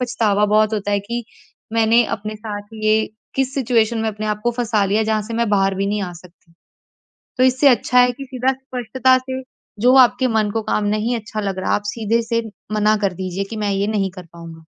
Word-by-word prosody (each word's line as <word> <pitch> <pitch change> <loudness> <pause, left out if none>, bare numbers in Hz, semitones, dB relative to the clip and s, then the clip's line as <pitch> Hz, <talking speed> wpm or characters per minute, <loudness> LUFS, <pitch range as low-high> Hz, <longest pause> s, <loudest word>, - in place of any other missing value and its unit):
पछतावा 210 -4 +1
बहुत 215 +1 +3
होता 205 -1 -2
है 200 - +1
कि 235 +3 -5 0.5
मैंने 230 +1 +4
अपने 215 +1 -7
साथ 210 -1 -6 0.2
ये 215 0 +4 0.4
किस 270 -1 0
सिचुएशन 235 -4 +1
में 220 0 0
अपने 215 0 -4
आप 210 0 -2
को 240 - +3
फँसा 230 -4 0
लिया, 210 +3 +1
जहाँ 215 -1 0
से 225 +2 -6
मैं 235 -1 0
बाहर 195 -1 +2
भी 195 +1 -1
नहीं 205 0 -1
आ 180 -2 -5
सकती। 170 0 -18 0.9
तो 255 - +3
इससे 260 +2 +4
अच्छा 250 0 +3
है 250 0 +5
कि 275 +3 -9
सीधा 260 0 0
स्पष्टता 260 -1 +1
से 260 0 -5 0.4
जो 250 +2 +5
आपके 255 0 +5
मन 220 -3 +1
को 225 +1 -1
काम 210 0 -1
नहीं 230 +3 -1
अच्छा 215 -1 -5
लग 195 -2 -3
रहा, - - -1
आप - - -2
सीधे 225 +2 0
से 230 0 -1 0.3
मना 215 0 +3
कर 190 - 0
दीजिए 185 +1 -4
कि - - -4
मैं 210 -1 -1
ये 200 +1 0
नहीं 200 -3 0
कर 185 -1 -11
पाऊँगा। 165 -1 -11
215 Hz, 220 wpm, -20 LUFS, 205-240 Hz, 0.9 s, है